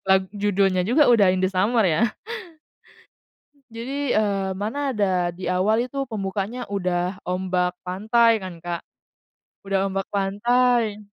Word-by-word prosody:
lag 190 0 +5
judulnya 195 -2 +1
juga 260 - +4
udah 205 -6 +5
In 185 - -1
The 185 - +2
Summer 210 +5 +2
ya? 165 +8 +2 1.7
Jadi, 270 +4 -3
eee, 195 -2 0
mana 275 +7 -2
ada 185 -6 0
di 185 - -9
awal 205 +4 +2
itu 275 - -9
pembukaannya 205 +3 -3
udah 180 0 -1
ombak 180 0 0
pantai 220 +5 +3
kan, 185 -2 -6
Kak, 175 -1 -3 0.9
udah 195 0 0
ombak 195 0 -3
pantai. 215 +2 +1
200 Hz, 130 wpm, -23 LUFS, 185-230 Hz, 1.7 s, lag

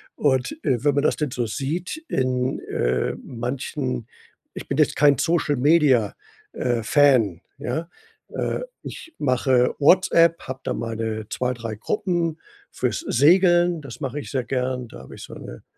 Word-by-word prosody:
Und, 130 -3 +1
äh, 130 -5 0
wenn 145 -2 +3
man 140 - +2
das - - +2
denn 150 -4 -2
so 120 -1 -1
sieht 160 - -3
in, 130 0 0
äh, 60 +1 -1
manchen 125 0 -4 0.5
ich - - -7
bin 140 - -2
jetzt 155 - +3
kein 145 -3 +5
Social 165 -3 +1
Media 135 -6 +3 0.4
äh, 120 -3 -1
Fan, 115 - +3 0.2
ja? 160 +4 -4 0.4
Äh, - - -2 0.2
ich 325 0 -9
mache 130 -2 +2
WhatsApp, 170 +1 +4
hab 130 +1 -6
da - - -2
meine 110 -1 -3
2, 125 0 -1
3 115 -2 -5
Gruppen 170 - -1 0.3
fürs - - -1
Segeln 175 +3 +4
das 135 -2 -10
mache 135 +2 -3
ich - - -8
sehr 130 -3 -1
gern. 125 -1 -2
Da 65 - -12
habe 65 - -12
ich - - -10
so - - -10
'ne - - -10
130 Hz, 160 wpm, -23 LUFS, 120-155 Hz, 0.5 s, kein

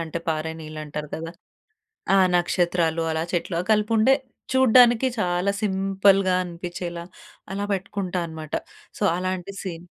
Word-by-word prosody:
అంటే 165 0 -4
పారే 160 0 -1
నీళ్లంటారు 155 -1 -6
కదా! 165 +1 -6 0.9
ఆ - - +5 0.2
నక్షత్రాలు 175 -2 +1
అలా 160 0 -1
చెట్లు 170 0 -1
కలిపి 210 +1 +2
ఉండే 260 +5 +5 0.4
చూడ్డానికి 250 -1 +6
చాలా 180 +1 +1
సింపుల్‌గా 195 -1 +3
అనిపించేలా 175 0 -6 0.5
అలా 200 +1 -3
బెట్టుకుంటా 190 -1 -3
అనమాట. 160 -1 -9 0.4
సో, - - -3
అలాంటి 185 +1 -3
సీన్ 175 -3 -6
180 Hz, 120 wpm, -24 LUFS, 165-195 Hz, 0.9 s, చూడ్డానికి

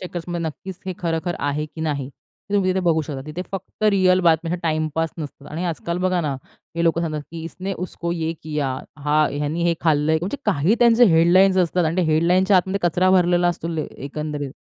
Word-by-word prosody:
चेकर्समध्ये 175 -1 -5
नक्कीच, 180 +4 -7
हे 185 - -2
खरं-खरं 170 0 -2
आहे, 145 +1 -1
की 155 +1 -11
नाही 145 -4 -2 0.4
हे - - -1
तुम्ही 190 -2 +2
तिथे 190 +1 0
बघू 165 -3 +2
शकता. 145 -3 -6
तिथे 155 +4 -5
फक्त 195 +2 -7
रिअल 185 -2 +4
बातम्या, 165 0 +2
टाईमपास 155 0 0
नसतात 145 -2 -8
आणि 165 +4 -3
आजकाल 170 +1 -3
बघा 185 -1 +1
ना, 150 -4 -1 0.4
हे 170 - +1
लोकं 165 0 +2
सांगतात, 155 -3 -2
की 165 0 -7
इसने 185 +4 -5
उसको 170 -1 -4
ये 165 -1 -2
किया 150 -3 -2 0.4
हां, 150 +1 +3
ह्यानी 150 +4 -2
हे 170 -1 +2
खाल्लंय 155 -1 +2
म्हणजे 190 - -3
काही 190 0 +2
त्यांचे 235 0 +6
हेडलाईन्स 185 +4 +5
असतात 180 -1 +2
आणि 160 +2 -1
ते 185 - +3
हेडलाईन्सच्या 180 +5 +3
आतमध्ये 190 +2 +1
कचरा 180 +3 +2
भरलेला 175 -1 +3
असतो 170 -1 -3 0.2
एकंदरीत. 145 0 -5
170 Hz, 190 wpm, -22 LUFS, 155-185 Hz, 0.4 s, त्यांचे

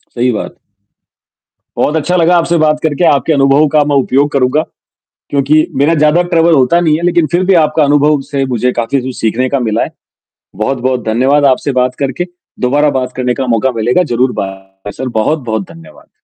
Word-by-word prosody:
सही 125 +1 +1
बात। 105 - -5 1.2
बहुत 150 - 0
अच्छा 165 +4 -1
लगा 175 0 +3
आपसे 170 0 +1
बात 155 -1 +1
करके, 160 +2 -1
आपके 145 +1 +2
अनुभव 140 +2 +3
का 150 0 +2
मैं 145 -1 0
उपयोग 140 +2 +1
करूँगा। 135 +2 +1 0.7
क्योंकि 145 +2 +2
मेरा 150 +4 +3
ज़्यादा 155 +2 +3
ट्रैवल 165 -1 +3
होता 155 +5 +3
नहीं 155 -3 +2
है, 165 - -6
लेकिन 175 -2 +2
फिर 175 +2 +1
भी 195 - +3
आपका 155 0 +1
अनुभव 145 +1 +2
से 140 -2 -1
मुझे 125 +2 0
काफ़ी 120 +4 -1
कुछ 130 0 -6
सीखने 115 +4 0
का 140 0 -1
मिला 115 -1 -1
है, - - -3 0.7
बहुत-बहुत 125 +1 -2
धन्यवाद 130 +6 +2
आपसे 135 +2 -2
बात 125 0 0
करके, 140 +5 -2 0.3
दोबारा 145 +4 +2
बात 125 -1 -4
करने 125 -1 -1
का 135 - -3
मौका 130 +4 0
मिलेगा 120 +10 +1
ज़रूर 125 +2 +1
बाय 95 +1 -8
सर 130 - -2
बहुत-बहुत 130 - -2
धन्यवाद। 165 0 -16
140 Hz, 185 wpm, -12 LUFS, 125-155 Hz, 1.2 s, लगा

